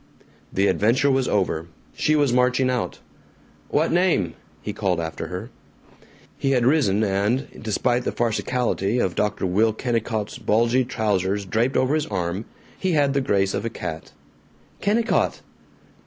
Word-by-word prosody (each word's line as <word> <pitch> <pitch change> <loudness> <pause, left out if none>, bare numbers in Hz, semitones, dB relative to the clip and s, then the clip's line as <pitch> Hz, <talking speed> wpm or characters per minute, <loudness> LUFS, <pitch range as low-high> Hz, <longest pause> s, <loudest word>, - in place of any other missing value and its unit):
The 95 - +1
adventure 120 +8 +3
was 130 -1 +1
over. 90 -5 0 0.3
She 155 - +1
was 145 -5 +2
marching 125 +1 +3
out. 120 -8 -2 0.7
"What 155 +3 +1
name?" 170 - +2 0.3
he 105 - -4
called 95 -5 0
after 80 -1 -4
her. - - -6 0.9
He 135 - +1
had 125 -2 +2
risen 120 -8 +3
and, 105 +6 0
despite 120 +3 0
the - - -1
farcicality 120 -2 0
of 95 -6 0
Dr. 105 0 -1
Will 105 +5 +2
Kennicott's 110 -2 -2
bulgy 120 +4 +2
trousers 100 -4 -1
draped 115 +7 +1
over 130 +2 +2
his 155 -1 0
arm, 95 +1 -2 0.3
he 185 -2 0
had 145 -3 +3
the 140 - +1
grace 100 -5 +1
of 100 - -2
a 115 - -1
cat. 80 -7 -6 0.7
"Kennicott." 220 +3 +1
115 Hz, 145 wpm, -23 LUFS, 100-130 Hz, 0.9 s, adventure